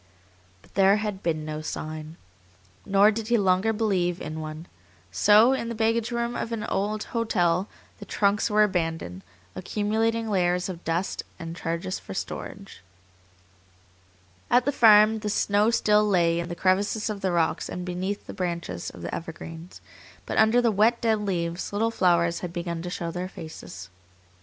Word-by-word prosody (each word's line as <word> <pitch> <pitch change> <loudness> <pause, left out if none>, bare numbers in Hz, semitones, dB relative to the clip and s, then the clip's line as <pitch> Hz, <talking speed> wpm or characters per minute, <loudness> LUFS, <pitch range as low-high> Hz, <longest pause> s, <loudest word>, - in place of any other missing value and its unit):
But - - -23
there 195 0 +5
had 210 -2 -3
been 155 -4 -1
no 155 0 -4
sign. 155 +1 -6 0.7
Nor 200 +2 +5
did 220 0 -4
he 240 0 +3
longer 190 +1 +2
believe 190 -6 0
in 155 +1 -6
one. 155 +1 -7 0.5
So 215 - +5
in 235 -3 -2
the 235 - -4
baggage 225 +1 +1
room 235 0 -2
of 230 - -3
an 225 -2 -3
hotel 205 -4 0 0.3
the - - -9
trunks 205 +2 +1
were 210 0 +4
abandoned, 165 - -2 0.3
accumulating 225 +4 -1
layers 180 -3 +1
of 175 -2 -7
dust 170 +4 -2 0.2
and 165 -1 -7
charges 170 +2 -3
for 95 - -9
storage. - - -7 1.7
At 245 +1 +4
the 285 - +2
farm 220 -3 +6
the 210 -1 -3
snow 205 +1 +2
still 210 -2 +3
lay 170 -5 +2
in 170 +1 -4
the 175 - -4
crevices 200 +4 +1
of 200 -2 -6
the 190 - 0
rocks 165 -1 0
and 180 - -5
beneath 185 +3 -3
the - - -8
branches 170 - -4
of 85 - -12
the - - -5
evergreens, 165 +1 -8 0.4
but - - -1
under 220 +3 +4
the 230 - +3
wet, 220 +4 +3
dead 225 -2 +1
leaves 170 -3 -2
little 225 +3 0
flowers 170 -4 +2
had 180 - -5
begun 170 -1 -4
to 180 - -5
show 170 -1 -4
their 180 +2 -4
faces. 155 - -10
190 Hz, 165 wpm, -26 LUFS, 170-215 Hz, 1.7 s, farm